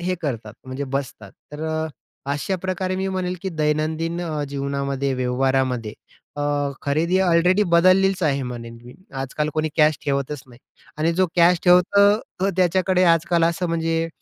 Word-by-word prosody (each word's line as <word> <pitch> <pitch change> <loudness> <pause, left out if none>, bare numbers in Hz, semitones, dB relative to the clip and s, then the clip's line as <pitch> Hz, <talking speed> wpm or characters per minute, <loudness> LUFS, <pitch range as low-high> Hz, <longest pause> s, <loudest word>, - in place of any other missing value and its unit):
हे 180 +1 -1
करतात 115 -7 -4
म्हणजे 130 +2 -5
बसतात. 125 -7 -5 0.2
तर 150 +2 -6
अ, 160 0 -1 0.5
अशा 165 +7 -2
प्रकारे 185 0 -2
मी 190 0 -2
म्हणेल 185 -1 -2
की 190 - -2
दैनंदिन 155 +1 -1
अ, 155 -4 -3
जीवनामध्ये 140 -1 -2
व्यवहारामध्ये 125 -2 0 0.4
अ, 145 - -2 0.4
खरेदी 165 +6 +1
ऑलरेडी 180 +2 +3
बदललेलीच 185 +2 +4
आहे 140 -3 +1
म्हणेन 115 -2 -7
मी 125 - -12 0.3
आजकाल 150 +3 -2
कोणी 155 0 0
कॅश 155 -1 +4
ठेवतच 140 0 -2
नाही. 120 -1 -17 0.4
आणि 165 +2 +1
जो 185 +2 +2
कॅश 175 0 +5
ठेवतो 180 +3 +5 0.4
तो 195 - +2
त्याच्याकडे 185 +1 +2
आजकाल 170 0 +3
असं 170 +2 0
म्हणजे, 165 0 -1
160 Hz, 150 wpm, -22 LUFS, 140-180 Hz, 0.5 s, कॅश